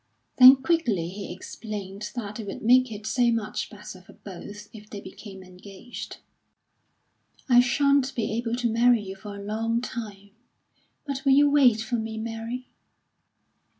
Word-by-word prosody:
Then 255 Hz, +1 st, +10 dB
quickly 260 Hz, -, 0 dB
he 200 Hz, +2 st, -7 dB
explained 200 Hz, +1 st, -7 dB
that 215 Hz, -2 st, -5 dB
it 215 Hz, -, -6 dB
would 195 Hz, -, -7 dB
make 250 Hz, +1 st, +4 dB
it 215 Hz, 0 st, -8 dB
so 240 Hz, +2 st, +2 dB
much 215 Hz, -2 st, -3 dB
better 205 Hz, -3 st, -11 dB
for 185 Hz, -, -17 dB
both 205 Hz, +2 st, -10 dB
if 215 Hz, -1 st, -13 dB
they 205 Hz, -, -7 dB
became 190 Hz, 0 st, -11 dB
engaged. 190 Hz, +5 st, -10 dB, 1.3 s
"I 245 Hz, -2 st, +6 dB
shan't 280 Hz, +2 st, +2 dB
be 225 Hz, -3 st, -2 dB
able 230 Hz, +1 st, -2 dB
to 245 Hz, -1 st, -1 dB
marry 235 Hz, -1 st, +3 dB
you 190 Hz, -1 st, -7 dB
for 200 Hz, +1 st, -9 dB
a 200 Hz, -, -8 dB
long 225 Hz, +3 st, -1 dB
time; 210 Hz, -5 st, -7 dB, 0.7 s
but 275 Hz, -2 st, -4 dB
will 275 Hz, -2 st, +4 dB
you 290 Hz, +1 st, +5 dB
wait 250 Hz, -7 st, +5 dB
for 225 Hz, +2 st, -2 dB
me, 220 Hz, 0 st, -5 dB
Mary?" 230 Hz, +3 st, -5 dB
220 Hz, 155 wpm, -25 LUFS, 205-245 Hz, 1.3 s, Then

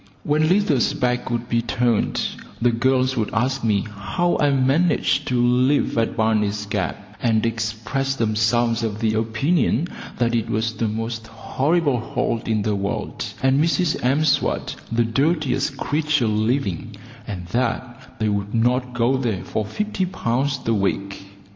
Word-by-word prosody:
When 155 Hz, +2 st, +2 dB
Lizer's 160 Hz, -8 st, +2 dB
back 125 Hz, -3 st, 0 dB
would 120 Hz, 0 st, -2 dB
be 115 Hz, 0 st, +1 dB
turned, 120 Hz, -1 st, 0 dB, 0.4 s
the 120 Hz, 0 st, +3 dB
girls 130 Hz, +2 st, +2 dB
would 110 Hz, -4 st, -1 dB
ask 130 Hz, +3 st, 0 dB
me 105 Hz, -3 st, +2 dB
how 110 Hz, -, -1 dB
I 145 Hz, -, +4 dB
managed 140 Hz, +6 st, +2 dB
to 125 Hz, -1 st, +1 dB
live 125 Hz, +4 st, +3 dB
at 115 Hz, -1 st, 0 dB
Barney's 105 Hz, -2 st, +1 dB
Gap, 105 Hz, 0 st, -4 dB
and 115 Hz, -2 st, +2 dB
expressed 115 Hz, +4 st, -2 dB
themselves 115 Hz, +1 st, +1 dB
of 110 Hz, -2 st, -2 dB
the 110 Hz, -1 st, +1 dB
opinion 120 Hz, +8 st, +1 dB, 0.3 s
that 120 Hz, -1 st, +1 dB
it 115 Hz, -1 st, 0 dB
was 110 Hz, +1 st, 0 dB
the 110 Hz, +1 st, -1 dB
most 115 Hz, +1 st, -4 dB
horrible 140 Hz, +5 st, 0 dB
hole 115 Hz, 0 st, -2 dB
in 110 Hz, -2 st, +1 dB
the 105 Hz, 0 st, 0 dB
world, 100 Hz, +1 st, -3 dB, 0.2 s
and 135 Hz, +2 st, +4 dB
Mrs 170 Hz, 0 st, +1 dB
M'Swat 140 Hz, +4 st, +1 dB, 0.2 s
the 115 Hz, +1 st, +2 dB
dirtiest 135 Hz, +2 st, 0 dB
creature 150 Hz, -2 st, +1 dB
living, 110 Hz, -, -1 dB, 0.3 s
and 95 Hz, -5 st, -5 dB
that 120 Hz, +2 st, -3 dB
they 110 Hz, -, 0 dB
would 100 Hz, +1 st, -2 dB
not 125 Hz, +2 st, +1 dB
go 120 Hz, +3 st, +2 dB
there 115 Hz, -8 st, -2 dB
for 110 Hz, -, -2 dB
50 205 Hz, -, -2 dB
pounds 135 Hz, -3 st, -1 dB
a 115 Hz, -, +2 dB
week. 100 Hz, -1 st, -2 dB
120 Hz, 150 wpm, -22 LUFS, 110-135 Hz, 0.4 s, I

